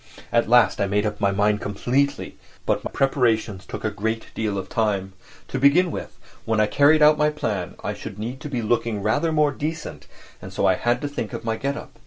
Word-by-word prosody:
At 115 -1 +2
last 120 -3 +4
I 100 - +2
made 105 +2 +1
up 105 0 -3
my 100 - +3
mind 105 +2 +1
completely. 135 +8 -1 0.3
But - - 0
my - - -4
preparations 115 -8 0
took - - -6
a 110 - 0
great 110 +3 -3
deal 105 -3 -2
of 95 - -4
time. 100 -4 -1 0.4
To 135 - -2
begin 160 +6 +4
with, - - -7 0.3
when 110 -1 0
I 110 - +5
carried 145 +7 +4
out 150 0 +6
my 150 0 +4
plan 105 -11 -3
I 105 - -2
should 105 0 -8
need 120 +6 -5
to 150 - -6
be 125 -4 -2
looking 110 -2 0
rather 145 +10 +1
more 150 -2 +3
decent, 155 +3 -5 0.3
and - - -9
so - - -1
I - - +5
had 120 +1 0
to 145 - -2
think 140 -6 -5
of - - -6
my 115 -1 0
get 140 +4 -2
up. - - -11
115 Hz, 225 wpm, -23 LUFS, 105-140 Hz, 0.4 s, out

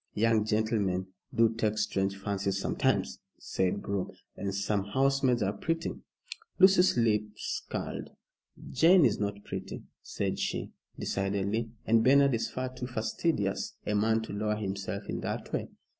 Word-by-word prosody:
"Young 110 0 +3
gentlemen 105 -4 0 0.2
do 115 -3 +3
take 110 -1 0
strange 100 -2 0
fancies 100 -1 -1
sometimes," - - 0 0.2
said 95 +2 -1
Groom, 100 -2 -2 0.3
"and 100 - -3
some 100 0 0
housemaids 135 +1 +2
are 100 +1 0
pretty." 165 +10 -2 0.7
Lucy's 190 -4 +6
lip 110 -3 +3 0.5
curled. - - -4 0.6
"Jane 165 +4 +6
is 110 -2 +2
not 100 0 -3
pretty," - - -6 0.2
said - - -3
she, - - -2 0.3
decidedly, 100 +3 -1 0.2
"and 115 0 +4
Bernard 140 +2 +5
is 115 - 0
far 130 0 -4
too 125 -1 -5
fastidious 110 -1 -1
a 105 - 0
man 110 +2 +2
to 110 - -7
lower 105 +1 0
himself 100 -2 -4
in - - -3
that - - -4
way." - - -1
110 Hz, 145 wpm, -30 LUFS, 100-125 Hz, 0.7 s, Lucy's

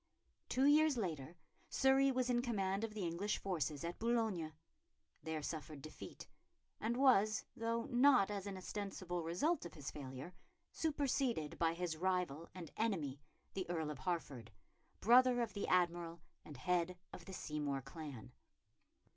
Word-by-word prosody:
Two 260 +2 +3
years 300 -1 +6
later 165 - -3 0.3
Surrey 270 +1 +4
was 255 -1 +1
in 240 -1 +2
command 200 -4 0
of 220 -1 -3
the 200 -4 -2
English 180 +5 -1
forces 155 -6 -2
at 170 +1 -4
Boulogne, 220 -9 +1 0.7
there 160 -1 -3
suffered 155 -1 -5
defeat, 155 - -9 0.5
and 235 +2 0
was, 215 -6 +4
though 230 0 -1
not 250 -6 +5
as 200 -1 -3
an 195 -1 -4
ostensible 185 -2 -4
result 180 - +1
of 170 - -8
his 145 -3 -5
failure, 135 +4 -7 0.4
superseded 270 - 0
by 165 0 +2
his 175 -2 -2
rival 180 -3 0
and 170 -4 -7
enemy, 160 -11 -1 0.3
the 190 -3 -3
Earl 160 -3 -1
of 145 - -7
Hertford, 135 -7 -3 0.5
brother 250 +2 +6
of 235 -2 -1
the 200 - -2
Admiral 170 -2 +1 0.2
and 145 - -10
head 180 +4 0 0.2
of - - -9
the 190 - -8
Seymour 145 -5 -2
clan. 135 -4 -8
180 Hz, 145 wpm, -38 LUFS, 160-230 Hz, 0.7 s, years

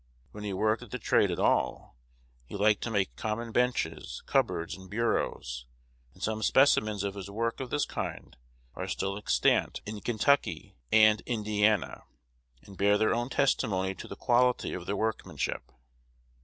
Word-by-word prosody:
When 105 - -9
he 105 - -3
worked 110 +4 +1
at 120 - -11
the - - -4
trade - - +2
at - - -2
all, - - 0 0.5
he - - -8
liked 105 +1 +3
to - - -2
make 100 -3 0
common 115 +1 -3
benches, 125 +2 -1
cupboards, 85 0 0
and 95 -1 -13
bureaus; 65 - -2 0.5
and - - -11
some 110 0 -1
specimens 110 -5 +3
of 100 -1 -2
his 100 -1 -7
work 115 +3 -2
of 130 -2 -5
this 145 - 0
kind - - -6 0.4
are - - -5
still 100 0 -2
extant 105 - +1
in 105 0 -6
Kentucky 120 +5 +1 0.2
and 110 0 +6
Indiana, 105 -3 0 0.6
and 100 -2 -14
bear 100 +1 +4
their 110 +1 +2
own 120 +2 -1
testimony 100 -9 +1
to - - -10
the - - -7
quality 125 +2 +2
of 90 -1 -6
their 100 +1 -1
workmanship. 110 +1 -3
110 Hz, 160 wpm, -29 LUFS, 100-115 Hz, 0.6 s, and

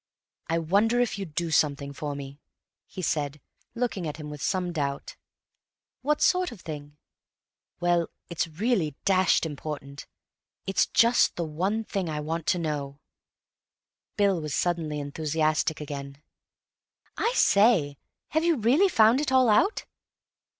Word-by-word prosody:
"I 165 - 0
wonder 200 +9 +2
if 240 -4 0
you'd 170 -7 -7
do 170 -1 -1
something 140 -2 +1
for 145 0 -4
me," 140 0 -8 0.5
he 185 - -7
said, 150 -3 -1 0.4
looking 230 -8 -2
at 150 - -5
him 150 -1 -7
with 150 -2 -8
some 180 -2 -1
doubt. 140 -3 -3 0.9
"What 300 +3 +1
sort 365 -3 +2
of 220 -6 -11
thing?" 145 -2 -8 0.8
"Well, 175 -1 +1 0.2
it's 170 -1 -2
really 165 - -1
dashed 185 -3 +3
important. 140 -2 -7 0.6
It's 195 +1 +2
just 235 +1 +4
the 170 - -2
one 185 +8 -1
thing 195 -5 -3
I 150 -1 -3
want 160 +3 -1
now." 150 -5 -3 1.2
Bill 200 -4 +2
was 150 -2 -3
suddenly 165 -4 -1
enthusiastic 155 +2 -1
again. 140 -1 -7 0.9
"I 465 - +1
say, 195 - +4 0.3
have 315 +1 +1
you 335 -2 +3
really 265 - +4
found 230 -2 +5
it 295 - -2
all 260 -2 +5
out?" 385 - +3
165 Hz, 135 wpm, -27 LUFS, 150-210 Hz, 1.2 s, found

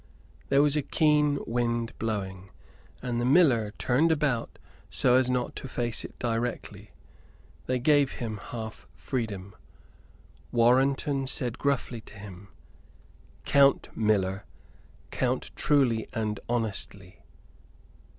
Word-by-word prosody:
There 140 +1 +5
was 150 0 +3
a 150 - +2
keen 150 0 +2
wind 120 0 -1
blowing 95 -4 -4 0.5
and 120 -2 -1
the - - 0
miller 125 -6 +4
turned 145 +7 +2
about 145 -7 0 0.3
so 125 - +3
as 130 0 +4
not 125 -1 -1
to - - -6
face 120 -3 -1
it - - -10
directly 120 0 -3 0.8
they 130 - +1
gave 140 +1 +3
him 115 -4 -4
half 110 +1 -8
freedom. 100 -7 -4 1.0
Warrenton 135 +3 +2
said 125 -3 -1
gruffly 135 -4 -1
to 105 - -15
him: 100 -1 -11 1.0
"Count, 140 -1 +3
miller; 100 -3 +1 0.7
count - - -1
truly 130 -7 +2
and 105 -2 -2
honestly." 100 -5 -3
120 Hz, 110 wpm, -28 LUFS, 110-135 Hz, 1.0 s, There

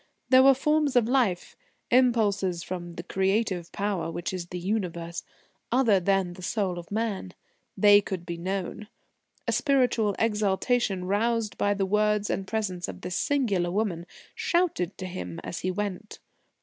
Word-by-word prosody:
There 260 0 +7
were 270 0 +7
forms 300 0 +1
of 240 -3 +4
life 235 -9 +1 0.4
impulses 205 -8 +2
from 175 -2 -6
the 170 - -6
Creative 190 -2 0
Power 200 -4 -2
which 175 +3 -4
is 180 -2 -4
the 180 - -6
Universe 175 -3 -3 0.5
other 235 -6 +4
than 190 -1 +1
the 185 - -12
soul 185 -2 -1
of 170 - -11
man. 210 - -2 0.4
They 205 0 +7
could 185 -3 -5
be 170 -1 -4
known. 190 +4 -4 0.6
A - - +2
spiritual 250 -8 +2
exaltation, 210 -2 +1
roused 220 +2 0
by 205 0 +1
the 195 -1 0
words 210 +1 +1
and 195 - -3
presence 190 -5 -2
of 90 - -8
this 180 - -4
singular 205 -12 +1
woman, 180 -3 -2 0.3
shouted 340 - 0
to 185 - -5
him 180 -2 -6
as - - -5
he 185 - -2
went. 205 +2 -4
200 Hz, 155 wpm, -27 LUFS, 180-225 Hz, 0.6 s, There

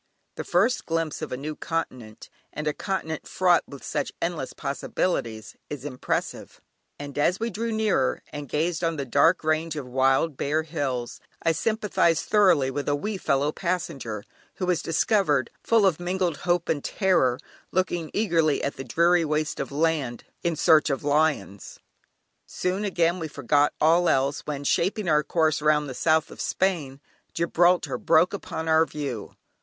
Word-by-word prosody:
The - - -5
first 205 +9 +1
glimpse 165 -2 -2
of 155 - -5
a 125 - -3
new 150 +3 -5
continent, 130 -11 -5 0.2
and 155 - -5
a 150 - 0
continent 160 -5 -4
fraught 180 -2 +3
with 140 -2 -11
such - - -2
endless - - -3
possibilities 110 - -3
is 145 -2 -6
impressive; 130 -3 -4 0.4
and 145 -1 -8
as 175 +6 +2
we 230 +1 -2
drew 230 +4 -3
nearer, 220 -1 +1
and 145 -2 -6
gazed 165 +3 -1
on 165 -1 +1
that 140 -5 -5
dark 165 +7 +4
range 155 +1 0
of 145 -3 -5
wild, 135 +3 +1
bare 155 +3 0
hills, 140 -6 -3 0.2
I 165 - +3
sympathised 195 -2 +1
thoroughly 180 -11 +4
with 145 +2 -3
a 145 - +2
wee 205 +8 -3
fellow 145 -4 +1
passenger 155 - -3 0.3
who 185 - -3
was 180 -2 +1
discovered, 165 - +1
full 225 -3 +3
of 180 -5 +2
mingled 175 -2 -1
hope 175 -1 +2
and 145 -3 -1
terror, 180 - +2 0.3
looking 175 -3 -1
eagerly 165 -8 +1
at 140 - -2
the 135 - -5
dreary 170 +7 +3
waste 155 0 -1
of 140 - -4
land 145 -5 0 0.2
in 170 -1 0
search 155 0 +4
of 135 0 -2
lions! 145 -9 0 0.7
Soon 185 +3 -2
again 175 -2 +1
we 160 - -3
forgot 145 0 +1
all 170 +3 +4
else, 135 +2 +1
when, 145 -2 -3
shaping 190 +7 0
our 150 -2 +4
course 155 -1 +1
round 150 -1 +2
the 130 - -5
south 160 +3 +1
of - - -8
Spain, 160 -8 -1 0.4
Gibraltar 175 +1 +2
broke 180 - +3
upon 160 -5 -5
our 160 0 +4
view. 135 -8 -5
160 Hz, 165 wpm, -25 LUFS, 145-175 Hz, 0.7 s, dark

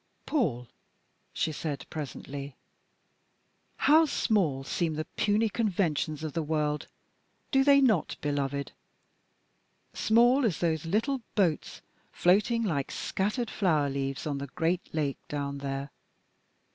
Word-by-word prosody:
"Paul," 135 - 0 0.6
she 160 - -1
said 145 -3 -4
presently, 140 -2 -6 1.2
"how 315 +2 +6
small 185 - +1
seem 160 +3 -1
the 155 +1 -3
puny 215 +6 +1
conventions 175 -8 -1
of 155 -3 -4
the 165 - 0
world, 150 -1 -1 0.6
do 270 -1 +4
they 280 0 +6
not, 220 - +2
beloved? 140 -1 -2 1.2
Small 240 +5 +4
as 200 -9 +1
those 165 -2 -1
little 235 - 0
boats 180 -8 0 0.3
floating 210 +6 +3
like 150 -10 -1
scattered 210 +5 -2
flower 155 -8 +1
leaves 135 +1 -3
on 145 -2 -2
the 140 - -5
great 170 +4 -1
lake 145 -3 -1
down 140 -1 -3
there. 135 0 -4
160 Hz, 120 wpm, -29 LUFS, 140-215 Hz, 1.2 s, how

